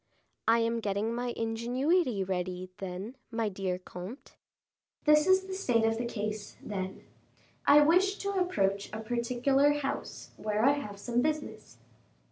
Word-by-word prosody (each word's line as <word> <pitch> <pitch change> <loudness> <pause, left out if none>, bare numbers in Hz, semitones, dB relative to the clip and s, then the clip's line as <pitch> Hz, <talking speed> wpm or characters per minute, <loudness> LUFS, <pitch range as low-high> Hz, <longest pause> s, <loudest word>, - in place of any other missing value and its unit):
"I 225 +1 +6
am 230 0 +1
getting 210 +1 -1
my 245 +1 -2
ingenuity 240 - +1
ready, 185 0 -3
then, 195 +6 -6
my 225 -2 -1
dear 185 -2 -2
comte." 185 +7 -9 0.7
"This 300 +2 +5
is 375 0 +5
the 380 - -6
state 245 - +2
of 225 0 +1
the 240 - -1
case, 215 -2 -4
then: 190 -2 -5 0.6
I 295 +1 +8
wish 370 +6 +4
to 400 -1 -2
approach 200 - 0
a 215 - -4
particular 245 +5 +2
house, 290 -2 -4
where 215 +1 0
I 275 - +7
have 275 -9 -4
some 240 +3 0
business." 305 +1 -3
230 Hz, 145 wpm, -30 LUFS, 205-285 Hz, 0.7 s, I